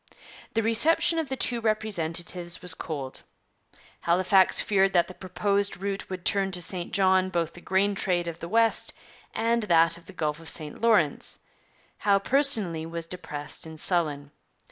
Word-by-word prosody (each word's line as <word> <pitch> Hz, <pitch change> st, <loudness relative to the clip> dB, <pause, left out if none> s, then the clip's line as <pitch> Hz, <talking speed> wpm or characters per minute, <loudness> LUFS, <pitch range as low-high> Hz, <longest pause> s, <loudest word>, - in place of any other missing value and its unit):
The 225 Hz, -, +1 dB
reception 310 Hz, +9 st, +3 dB
of 315 Hz, -5 st, -3 dB
the 265 Hz, -, -2 dB
two 240 Hz, -2 st, +1 dB
representatives 175 Hz, -5 st, -1 dB
was 180 Hz, -2 st, +2 dB
cold. 140 Hz, -5 st, -6 dB, 0.8 s
Halifax 185 Hz, +2 st, +4 dB
feared 195 Hz, -1 st, +2 dB
that 175 Hz, -2 st, +3 dB
the 185 Hz, -, -10 dB
proposed 200 Hz, +2 st, -1 dB
route 195 Hz, +1 st, -4 dB
would 185 Hz, -2 st, -7 dB
turn 195 Hz, -1 st, +2 dB
to 180 Hz, -, +2 dB
St 175 Hz, 0 st, -3 dB
John 190 Hz, -2 st, +3 dB
both 170 Hz, -3 st, -2 dB
the 175 Hz, -, -13 dB
grain 195 Hz, +3 st, +1 dB
trade 180 Hz, -3 st, -1 dB
of 170 Hz, 0 st, -6 dB
the 170 Hz, -, -7 dB
west 225 Hz, +2 st, +2 dB, 0.4 s
and 235 Hz, +1 st, 0 dB
that 170 Hz, -5 st, +3 dB
of 170 Hz, -, -23 dB
the 195 Hz, -, -11 dB
Gulf 150 Hz, -3 st, -2 dB
of 165 Hz, -1 st, -9 dB
St 155 Hz, +2 st, -4 dB
Lawrence. 210 Hz, -11 st, +2 dB, 0.6 s
Howe 200 Hz, -1 st, +3 dB
personally 215 Hz, -, +2 dB
was 165 Hz, 0 st, -6 dB
depressed 160 Hz, -3 st, -6 dB
and 160 Hz, -1 st, -10 dB
sullen. 150 Hz, -6 st, -1 dB
185 Hz, 165 wpm, -26 LUFS, 170-205 Hz, 0.8 s, Halifax